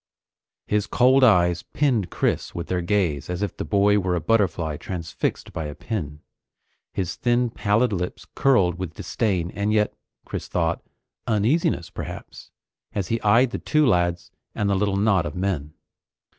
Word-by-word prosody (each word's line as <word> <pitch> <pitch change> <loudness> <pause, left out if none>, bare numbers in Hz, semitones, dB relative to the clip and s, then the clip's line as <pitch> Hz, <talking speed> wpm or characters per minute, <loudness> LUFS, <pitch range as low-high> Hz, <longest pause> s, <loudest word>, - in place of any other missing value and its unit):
His 105 -1 0
cold 130 +2 +4
eyes 90 -7 +4
pinned 120 - 0
Chris - - -1
with 85 -1 -5
their 90 -1 0
gaze 85 -6 0
as 90 +3 -2
if 100 - -3
the - - -4
boy 105 0 +3
were 90 -2 0
a - - 0
butterfly 85 -5 +1
transfixed 85 -2 -4
by 80 - -3
a 75 -1 -6
pin. 75 -10 -5 0.7
His 95 -3 -3
thin, 120 0 +1
pallid 105 +3 +1
lips 90 -1 -4
curled 95 -10 +3
with 90 -3 -5
disdain 95 -7 -1
and 100 +1 -1
yet, 105 -1 +2 0.3
Chris - - -5
thought, 85 -1 0 0.5
uneasiness 115 - +1
perhaps, - - -8 0.5
as 100 -4 -2
he 115 0 0
eyed 115 +4 +4
the - - -3
two 155 -1 +2
lads 85 -6 +1 0.2
and 105 - 0
the 100 - +2
little 100 0 +1
knot 100 -5 +2
of 75 - -7
men. 90 -6 -2
100 Hz, 160 wpm, -24 LUFS, 85-110 Hz, 0.7 s, cold